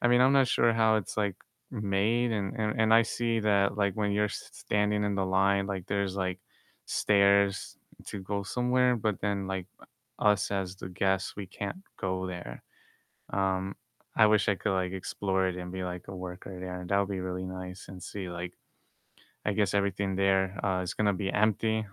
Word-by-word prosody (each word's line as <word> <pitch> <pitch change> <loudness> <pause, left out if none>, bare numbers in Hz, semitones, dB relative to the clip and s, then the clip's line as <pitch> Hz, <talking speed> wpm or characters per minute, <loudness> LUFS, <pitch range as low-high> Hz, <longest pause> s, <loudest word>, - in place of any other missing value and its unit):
I - - +2
mean, 120 0 +5
I'm 130 +2 +6
not 135 -2 +5
sure 120 -1 +4
how 110 -1 +4
it's, 105 - -3
like, 100 -3 +1 0.4
made 105 +4 +1
and 100 -3 -2
and 110 0 -1
and 110 0 +5
I 115 - +7
see 115 0 -1
that, 100 -2 +2
like, 100 -1 +1
when 105 -1 +1
you're 105 +1 +2
s - - -7
standing 105 0 0
in 100 -1 0
the 95 -1 0
line, 95 +1 +3
like, 95 -3 -4
there's, 100 -1 -1
like, 95 -1 -1 0.5
stairs 100 -1 +3 0.3
to 105 - -5
go 100 +1 -2
somewhere, 125 +3 +2
but 110 -3 -1
then, 100 -1 -1
like, 95 -2 -3 0.5
us 105 -1 +3
as 95 -2 -2
the 95 - -7
guests, 95 +1 0
we 100 -2 -5
can't 105 - -6 0.2
go 95 -1 -2
there, 90 -1 -7 0.7
um 95 0 0 0.4
I 110 - +7
wish 105 0 +3
I 100 - +3
could, 105 - -1
like, 90 0 0
explore 95 0 -1
it 90 - -3
and 90 0 -6
be, 95 0 -3
like, 90 0 -6
a 95 - -6
worker 90 +1 -7
there, 90 0 -5
that 100 - +3
would 100 -1 +1
be 95 - -3
really 90 0 -3
nice 95 0 -7
and 90 -2 -9
see, 95 -3 -5
like 85 +1 -5 0.9
I 105 - 0
guess 105 -2 +1
everything 100 -1 0
there, 95 -1 +2
uh, 95 -2 +1
is 90 - -3
gonna 105 -2 +2
be 95 0 -1
empty, 110 +1 +2
100 Hz, 195 wpm, -29 LUFS, 95-105 Hz, 0.9 s, I